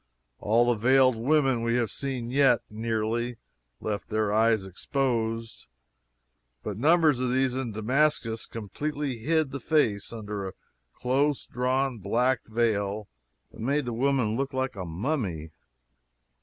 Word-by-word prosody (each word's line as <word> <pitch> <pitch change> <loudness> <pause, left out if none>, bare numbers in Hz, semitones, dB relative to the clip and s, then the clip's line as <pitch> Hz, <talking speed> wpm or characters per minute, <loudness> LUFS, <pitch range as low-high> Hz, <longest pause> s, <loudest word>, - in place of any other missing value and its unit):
All 115 +3 +3
the 120 - +3
veiled 130 +2 +5
women 135 0 +2
we 115 0 +1
had 120 -4 0
seen 130 -4 -4
yet, 135 -3 +4
nearly, 115 +2 -2 0.4
left 105 -1 -4
their 110 -2 0
eyes 110 -2 +3
exposed, 115 +2 -2 1.0
but 105 - -4
numbers 155 - +4
of 125 -1 0
these 130 0 +1
in 130 -3 -2
Damascus 115 0 0
completely 140 +4 -4
hid 155 +3 +1
the 140 - -4
face 120 -8 +1
under 105 -3 -5
a 95 - -7 0.4
close 135 - 0
drawn 130 0 -1
black 120 +6 +1
veil 105 -3 0 0.4
that - - -15
made 140 +5 0
the 120 - -3
woman 125 -3 +1
look 135 +2 -2
like 130 -2 -1
a 95 -2 -5
mummy. 90 - -3
120 Hz, 135 wpm, -27 LUFS, 110-135 Hz, 1.0 s, veiled